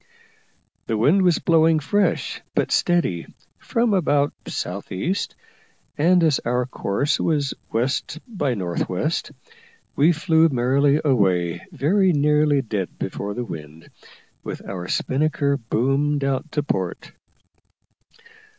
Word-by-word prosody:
The 110 - 0
wind 150 - +4
was 180 -3 +3
blowing 165 -1 +3
fresh, 165 -2 0
but - - 0
steady, 170 - +1 0.3
from 230 -2 0
about 145 -6 +2
south 95 +3 -5
east, 170 - -2 0.6
and 175 +3 +3
as 155 -4 +3
our 125 +1 -1
course 130 +3 -1
was 145 -4 0 0.2
west 130 +6 -1
north 120 - -2
west, 150 - -2 0.6
we 150 +5 +4
flew 165 0 +3
merrily 140 +3 +2
away 90 - +1
very 180 +5 +2
nearly 150 -1 +3
dead 105 -5 -4
before 100 0 -4
the 125 - -3
wind, 80 -4 -9 0.5
with - - -7
our 90 -2 -5
spinnaker 140 +3 0
boomed 135 +5 0
out 135 +3 -2
to 150 - 0
port. - - -3
140 Hz, 115 wpm, -22 LUFS, 115-160 Hz, 0.6 s, wind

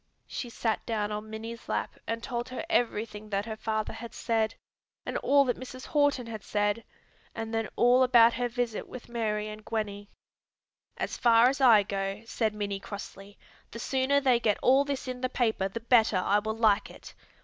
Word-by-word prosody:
She 245 - -5
sat 225 -1 -1
down 215 -2 -1
on 210 +1 -5
Minnie's 225 +1 -7
lap, - - -2
and 230 0 -3
told 240 -1 -3
her 255 +5 -5
everything 215 -6 -1
that 200 0 -1
her 220 -1 -5
father 215 0 -2
had 235 0 -9
said, 225 -1 0 0.5
and - - -4
all 280 0 +4
that 245 - -1
Mrs. 255 0 -9
Horton 285 -4 +2
had 220 -3 -7
said, 205 +2 0 0.5
and 225 0 -5
then 225 -1 -1
all 245 +2 +5
about 240 -2 +6
her 245 +1 -1
visit 240 -2 -3
with 250 - -10
Mary 215 -3 -1
and 215 0 -8
Gwenny. 205 -2 -4 0.9
"As - - -3
far 235 0 +6
as 275 +1 -3
I 225 -6 +7
go," 195 +1 -3
said 220 -2 -1
Minnie 200 -1 -3
crossly, 200 0 -9 0.3
"the 230 - -9
sooner 265 +4 +1
they 255 -4 +3
get 215 -3 +1
all 265 +2 +5
this 280 -2 -3
in 250 0 -5
the 255 - 0
paper 220 -6 0
the 195 +4 -6
better 225 -3 +4
I 200 +3 +2
will 220 +1 -4
like 215 -2 +3
it. - - -12
225 Hz, 190 wpm, -29 LUFS, 210-245 Hz, 0.9 s, I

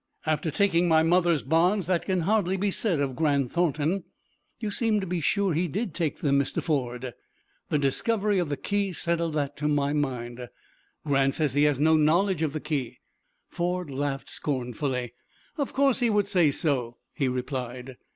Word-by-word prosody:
"After 155 0 0
taking 175 +1 +2
my 160 -1 +4
mother's 170 -2 +3
bonds, 175 +6 +2
that 180 0 0
can 185 -2 0
hardly 195 0 +1
be 200 +1 0
said 185 -6 +1
of 135 -2 -1
Grant 140 -3 +1
Thornton." 170 +2 0 0.6
"You 215 -3 -3
seem 220 0 +1
to 195 - -3
be 175 -1 -2
sure 195 +3 +1
he 170 +4 0
did 195 - -3
take 165 -3 -2
them, 140 -2 +3
Mr. 140 - -1
Ford." 125 -5 -2 0.6
"The - - +2
discovery 205 - +1
of 175 -4 -1
the 145 - -2
key 200 -2 -1
settled 170 -1 -1
that 145 -1 -1
to 150 +1 -1
my 145 -1 +1
mind." 125 -4 -3 0.6
"Grant 135 -2 +2
says 150 -5 0
he 145 +1 +3
has 145 -3 +2
no 160 +2 +4
knowledge 170 +3 +2
of 155 -3 0
the 155 - -2
key." 145 -5 -3 0.5
Ford 175 -2 -2
laughed 135 0 -3
scornfully. 125 -2 -3 0.5
"Of 280 - -1
course 275 -2 +2
he 240 -2 +2
would 210 -2 +2
say 180 -6 +3
so," 130 -5 -1 0.2
he 140 - 0
replied. 125 0 -4
155 Hz, 180 wpm, -26 LUFS, 140-180 Hz, 0.6 s, my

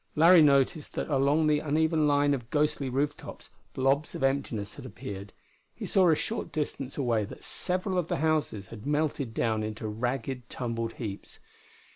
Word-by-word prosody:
Larry 165 +2 +7
noticed 140 +1 +3
that - - -3
along 140 +3 +3
the 150 -1 +3
uneven 155 +1 +2
line 145 0 +3
of 120 -4 -4
ghostly 145 -2 0
roof 145 +3 0
tops, - - -11 0.2
blobs 135 +3 +1
of - - -4
emptiness 135 -7 -1
had - - -10
appeared; 100 0 -8 0.4
he - - -6
saw 185 -3 +4
a 160 - +5
short 225 +8 -3
distance 140 -3 -4
away 120 -6 +1
that - - -11
several 185 +1 0
of 170 - -2
the - - -1
houses 150 -9 0
had 115 +2 -9
melted 145 -4 0
down 110 -1 0
into 110 +1 -4
ragged, 125 +3 -3
tumbled 115 -2 -3
heaps. 105 -4 -7
140 Hz, 170 wpm, -28 LUFS, 115-155 Hz, 0.4 s, Larry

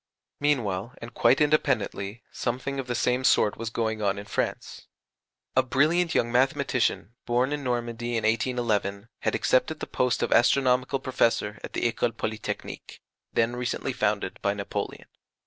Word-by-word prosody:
Meanwhile, 120 -5 0
and 115 +1 -9
quite 135 - +4
independently, 125 -8 +1
something 130 +3 -3
of 130 - -4
the 120 - -1
same 125 +2 +1
sort 105 -4 +4
was 115 0 -4
going 110 -1 -2
on 100 -1 +1
in 100 - -6
France. 105 - -3 0.7
A 130 - +6
brilliant 155 +6 +2
young 120 - +2
mathematician, 130 - +1
born 125 +4 +2
in 145 -1 -3
Normandy 120 -1 -2
in 115 - -2
1811, 110 -3 0
had - - 0
accepted 155 +5 +1
the - - -4
post 125 -1 0
of - - -1
Astronomical 130 +1 +3
Professor 115 -5 0
at - - -7
the - - -2
École 120 -1 0
Polytechnique, 110 0 -5 0.3
then 115 +1 +1
recently 125 0 -2
founded - - -1
by - - +1
Napoleon. - - -4
120 Hz, 150 wpm, -27 LUFS, 110-130 Hz, 0.7 s, A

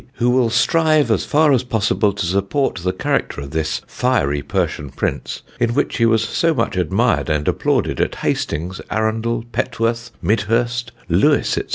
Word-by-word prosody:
"who 125 -1 +1
will 125 -2 +3
strive 155 +5 +3
as - - +1
far 150 0 +3
as 125 - +3
possible 110 -3 +1
to 100 -2 -3
support 100 +8 0
the 90 +1 -1
character 95 - -1
of 70 -1 -7
this 80 0 -2
fiery 110 - 0
Persian 70 +1 -2
Prince, 65 - -4 0.2
in 120 -1 +1
which - - 0
he 115 - +3
was 115 -1 +3
so 165 -1 +1
much 115 -6 -1
admired 95 +5 +1
and 75 -1 0
applauded - - 0
at - - -1
Hastings, 90 +5 -2
Arundel, 115 +1 -1
Petworth, 115 -1 -1
Midhurst, 115 +3 0 0.2
Lewes, 100 - +3
&c." - - 0
115 Hz, 165 wpm, -19 LUFS, 95-125 Hz, 0.2 s, will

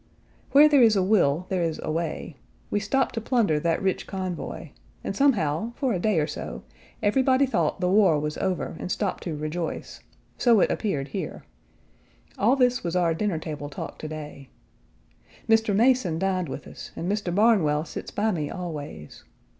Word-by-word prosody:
Where 290 +2 +8
there 290 -3 +5
is 225 -3 +6
a 190 - +3
will 180 -5 +2
there 185 -2 0
is 165 -2 -1
a - - -2
way. 165 -1 -3 0.4
We 205 - +1
stopped 240 +7 0
to 225 - -3
plunder 215 - +2
that 165 +4 0
rich 190 -1 -1
convoy, 185 -3 -5 0.3
and - - -3
somehow, 225 - +1
for 265 -4 0
a 180 - -1
day 205 -2 +2
or 150 - +2
so, - - -6 0.4
everybody 260 +5 +3
thought 175 - 0
the 180 - +2
war 185 -5 +4
was 150 0 -3
over 185 -3 -2
and 180 - -4
stopped 200 -3 -2
to 165 -4 -3
rejoice: 155 +2 -4 0.4
so 235 -4 +5
it - - +3
appeared 145 -11 -2
here. - - -5 1.0
All 235 +6 +4
this 250 -2 +2
was 170 0 -2
our 175 -2 +2
dinner 195 0 -1
table 150 -2 -6
talk 140 - -7
to 155 - -5
day. 150 -3 -8 1.0
Mr. 225 -2 +3
Mason 230 -7 +3
dined 185 -2 -1
with 140 - -6
us - - -10
and 170 - -4
Mr. 205 -1 -1
Barnwell 185 -9 +3
sits - - -7
by 215 +2 0
me 155 -6 -2
always. 150 - -7
185 Hz, 180 wpm, -25 LUFS, 155-220 Hz, 1.0 s, Where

